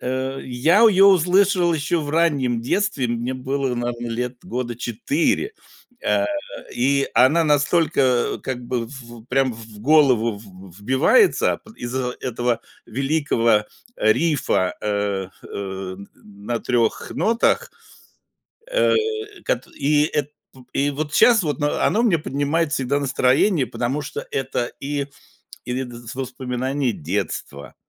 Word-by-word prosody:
Э, 130 +1 -3
я 145 - +2
её 200 -3 +7
услышал 180 0 +4
ещё 155 +3 0
в 145 -1 -4
раннем 140 -8 +1
детстве, 135 - 0
мне 120 +2 -2
было, 130 0 -2
наверно, 120 0 -3
лет 125 +2 -3
года 120 -1 -4
4, 140 - -1 0.5
а, 300 - +2 0.5
и 135 +3 +1
она 150 +7 +5
настолько 145 -4 +2
как 125 -2 -4
бы 120 -2 -2
в 120 -3 -11
прям 130 0 +1
в 110 -2 -12
голову 130 -5 +4
в 95 -2 -14
вбивается 130 - +3
па 225 - -14
из-за 125 +1 -3
этого 120 -1 -1 0.3
великого 125 -4 +1 0.3
рифа, 115 - +1
э, 100 -2 -1 0.2
э, 95 -1 -5 0.2
на 105 +3 -6
3 120 -3 0
нотах. 240 - +1 1.0
Э, - - +3 0.5
кат - - -1
и 145 +1 +3
эт 150 -2 -2 0.2
п 130 - -16
и 140 +1 +1
вот 150 +2 -4
щас 235 -4 +6
вот 150 0 -2
оно 195 +9 +1
мне 190 -8 +3
поднимает 150 +3 -1
всегда 135 +2 0
настроение, 140 +4 +2
потому 125 +4 -2
что 140 - -6
это 130 -2 -2
и 140 0 -3 0.6
и 125 +2 -2
дз 120 -2 -9
воспоминания 130 0 -2
детства, 70 -4 -4
130 Hz, 125 wpm, -22 LUFS, 120-150 Hz, 1.0 s, её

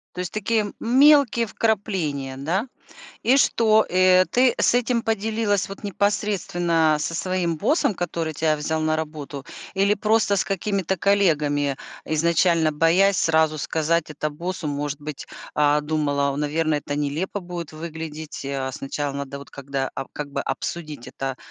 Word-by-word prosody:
То - - -6
есть 180 -2 -4
такие 215 0 0
мелкие 265 -1 +5
вкрапления, 185 -12 -1
да, 180 - -1 0.6
и 255 +3 +4
что, 220 -5 +4
э, 185 0 +5
ты 250 0 +3
с - - +3
этим 245 -1 +1
поделилась 220 -2 0
вот 195 +2 -10
непосредственно 175 -5 +1
со 160 +2 -3
своим 180 -1 -1
боссом, 225 - +1
который 165 -2 -3
тя 155 +1 +1
взял 155 +1 -2
на 155 0 +1
работу, 150 -3 -6 0.3
или 200 +1 +3
просто 210 0 +2
с - - +1
какими-то 195 -1 -1
коллегами, 150 -8 +2 0.3
изначально 165 0 +2
боясь 175 +6 +3
сразу 160 -1 +3
сказать 160 +2 0
это 150 +1 -3
боссу? 170 +2 -5
Может 145 0 -3
быть, 150 -1 -7 0.3
а, 150 0 +3
думала, 145 -2 0
наверно, 155 +2 0
это 145 0 -3
нелепо 150 +8 -2
будет 175 -3 -7
выглядеть, 160 -2 -7
э, 135 -1 -2
сначала 140 +2 -4
надо 140 0 -5
вот 140 - -12
когда 135 -1 -3
ап 135 - -5
как 145 -1 -6
бы, 140 - -1
обсудить 150 -5 -5
это, 135 0 -4
165 Hz, 150 wpm, -23 LUFS, 150-200 Hz, 0.6 s, мелкие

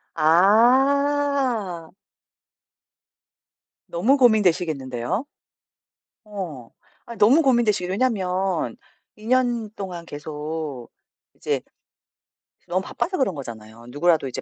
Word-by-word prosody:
아. 240 - +2 2.0
너무 225 +12 +2
고민되시겠는데요? 175 - +1 1.0
어. 175 - -7 0.4
아 235 - -9
너무 250 +11 +5
고민되시 235 - +2
왜냐하면 190 -3 -1 0.4
2 215 - -15
년 240 -3 +1
동안 180 -4 -7
계속 150 -3 -6 0.5
이제 - - -2 1.1
너무 185 +1 0
바빠서 370 - -3
그런 260 -8 +1
거잖아요. 115 -4 -10
누구라도 155 +2 +1
이제 130 - -6
190 Hz, 195 characters per minute, -23 LUFS, 155-240 Hz, 2.0 s, 너무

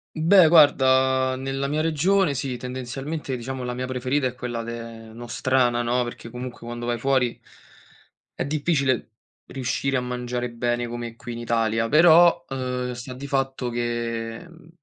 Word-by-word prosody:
Beh 170 +2 +6
guarda, 130 -4 +4
nella 135 +1 -3
mia 150 +2 0
regione 165 +1 +2
sì, 130 -1 -3
tendenzialmente 130 +3 -5
diciamo 130 +2 -5
la 125 0 -3
mia 130 +1 -4
preferita 130 +2 0
è 125 - -6
quella 120 -2 -4
de 115 -1 -8
nostrana 120 +1 0
no, 120 +1 +1
perché 120 -1 -8
comunque 125 +1 -7
quando 120 0 -5
vai 120 -1 -1
fuori 130 -2 +1 1.0
è - - -1
difficile 140 -4 0 0.4
riuscire 135 +1 -2
a 125 - +1
mangiare 125 0 -3
bene 120 +1 -1
come 120 -1 -6
qui 120 0 -8
in - - -6
Italia; 115 -1 0
però, 170 +4 +6
ehm, 125 -1 -3
sta 125 +1 -7
di 135 +3 -8
fatto 135 -2 -1
che, 115 0 -3
mhmm, 170 -1 -17
125 Hz, 155 wpm, -24 LUFS, 120-135 Hz, 1.0 s, Beh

